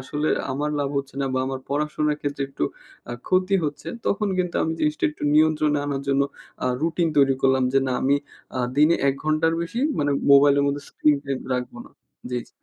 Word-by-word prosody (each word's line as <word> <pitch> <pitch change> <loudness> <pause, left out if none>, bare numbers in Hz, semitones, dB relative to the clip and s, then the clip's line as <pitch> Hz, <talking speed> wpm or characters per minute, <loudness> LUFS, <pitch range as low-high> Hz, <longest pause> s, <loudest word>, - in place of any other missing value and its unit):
আসলে 150 +3 -2 0.2
আমার 150 +2 -2
লাভ 140 -1 0
হচ্ছে 140 -1 -6
না 135 - 0
বা - - +1
আমার 135 0 -4
পড়াশোনার 150 +1 0
ক্ষেত্রে 145 -1 -3
একটু 135 - -2 0.5
আ - - -3 0.2
ক্ষতি 185 +1 +2
হচ্ছে। 145 0 -4 0.2
তখন 205 0 +1
কিন্তু 180 -1 -1
আমি 160 - 0
জিনিসটা 150 0 0
একটু 150 - -14
নিয়ন্ত্রণে 155 -1 +3
আনার 140 -1 -2
জন্য, 140 0 +3 0.4
আ - - +1 0.2
রুটিন 170 +1 +1
তৈরি 135 -2 +5
করলাম 130 -1 +3
যে 135 - +5
না, 130 - -1
আমি 140 +2 +3 0.4
আ - - -1 0.2
দিনে 150 +3 +5
১ 135 - +2
ঘন্টার 155 +1 +2
বেশি 185 +8 -4 0.2
মানে 145 -1 +1 0.2
মোবাইলের 140 0 +6
মধ্যে 140 0 -1
স্ক্রিনটাইম 140 -3 0
রাখবো 125 -1 -4
না। - - -16 0.4
জি, 125 - -1
জি। - - -21
145 Hz, 195 wpm, -23 LUFS, 135-155 Hz, 0.5 s, মোবাইলের